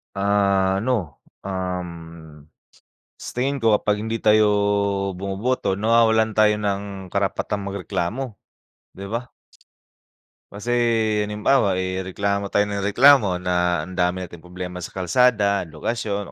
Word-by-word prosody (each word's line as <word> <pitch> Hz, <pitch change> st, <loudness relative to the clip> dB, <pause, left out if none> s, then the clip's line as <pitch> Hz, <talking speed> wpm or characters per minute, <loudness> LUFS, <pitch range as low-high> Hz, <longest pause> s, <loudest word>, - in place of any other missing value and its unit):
Ano, 100 Hz, -, +1 dB, 0.2 s
um, 90 Hz, -2 st, -3 dB, 1.3 s
sa -, -, -8 dB
tingin 135 Hz, +3 st, -1 dB
ko 115 Hz, -4 st, +3 dB
kapag 105 Hz, 0 st, 0 dB
hindi 110 Hz, 0 st, -3 dB
tayo 110 Hz, 0 st, +5 dB, 0.7 s
bumuboto 100 Hz, +2 st, -1 dB
nawawalan 110 Hz, +1 st, +3 dB
tayo 105 Hz, -1 st, +5 dB
ng 100 Hz, -1 st, -1 dB, 0.3 s
karapatan 100 Hz, +1 st, -2 dB
magreklamo, 100 Hz, +4 st, -4 dB, 0.6 s
'di 100 Hz, -, -8 dB
ba? 120 Hz, +2 st, -4 dB, 1.2 s
Kasi 105 Hz, +4 st, -5 dB, 0.6 s
halimbawa, 105 Hz, -1 st, +2 dB
eh, 95 Hz, 0 st, -2 dB
reklamo 100 Hz, +1 st, -1 dB
tayo 105 Hz, +1 st, +2 dB
ng 100 Hz, -, -2 dB
reklamo 105 Hz, 0 st, +5 dB
na 90 Hz, -2 st, 0 dB
ang 90 Hz, -, -9 dB
dami 90 Hz, +1 st, +1 dB
nating 85 Hz, -1 st, -10 dB
problema 90 Hz, +1 st, -7 dB
sa 90 Hz, -, -8 dB
kalsada, 100 Hz, -1 st, +2 dB
lokasyon 100 Hz, +4 st, -4 dB
100 Hz, 115 wpm, -22 LUFS, 95-110 Hz, 1.3 s, tayo